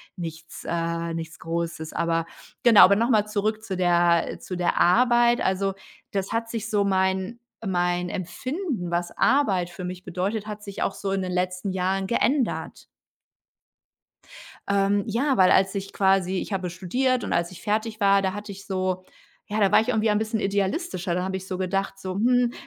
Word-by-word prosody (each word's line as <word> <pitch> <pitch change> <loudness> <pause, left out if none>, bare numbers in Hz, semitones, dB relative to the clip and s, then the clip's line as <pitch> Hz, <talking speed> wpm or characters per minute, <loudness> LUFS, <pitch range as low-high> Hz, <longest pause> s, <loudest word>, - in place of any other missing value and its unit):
nichts 165 -2 -8
äh, 170 0 -2
nichts 165 0 -6
Großes. 165 -1 -4
Aber 165 0 0 0.4
genau, 230 -4 +8
aber 200 +2 +4
noch 230 +4 +1
mal 215 -3 +3
zurück 215 +1 -1
zu 195 -3 -4
der 175 -2 +3
äh, - - -11
zu 185 - -6
der 175 -1 0
Arbeit. 240 +5 +4
Also 195 +1 0 0.4
das 195 -1 -2
hat 230 0 -1
sich 225 -1 -4
so 205 -2 +2
mein 190 +3 0 0.3
mein 180 -1 0
Empfinden, 255 - -4
was 175 0 -1
Arbeit 205 -10 +2
für 175 +1 -9
mich 180 0 -6
bedeutet, 195 +4 -3
hat 210 0 -7
sich 200 -1 -7
auch - - -1
so 195 - -3
in 195 0 0
den 185 -1 -3
letzten 185 +2 -1
Jahren 190 +1 -1
geändert. 245 +3 0 1.9
Ähm, 200 0 +2
ja, 270 +3 +1
weil 185 -1 +6
als 190 0 +4
ich 195 0 -4
quasi 190 -1 +2
ich - - -5
habe 185 -2 -2
studiert 245 +9 0
und - - -2
als 170 +1 0
ich 185 - -11
fertig 215 +1 -1
war, 200 -1 +4
da 190 -1 -1
hatte 205 0 -7
ich 200 +1 -11
so 185 -1 -2 0.4
ja, 215 0 -2
da 200 - +4
war - - +6
ich 225 - -3
irgendwie 220 -2 +2
ein 210 - +3
bisschen 220 +1 -1
idealistischer. 195 - -1
Da 180 +1 -1
habe 190 0 -3
ich 190 0 -5
so 185 -1 -4
gedacht 195 +1 -2
so: 185 -1 -5
„Hm, 245 +2 +2
195 Hz, 190 wpm, -25 LUFS, 180-215 Hz, 1.9 s, genau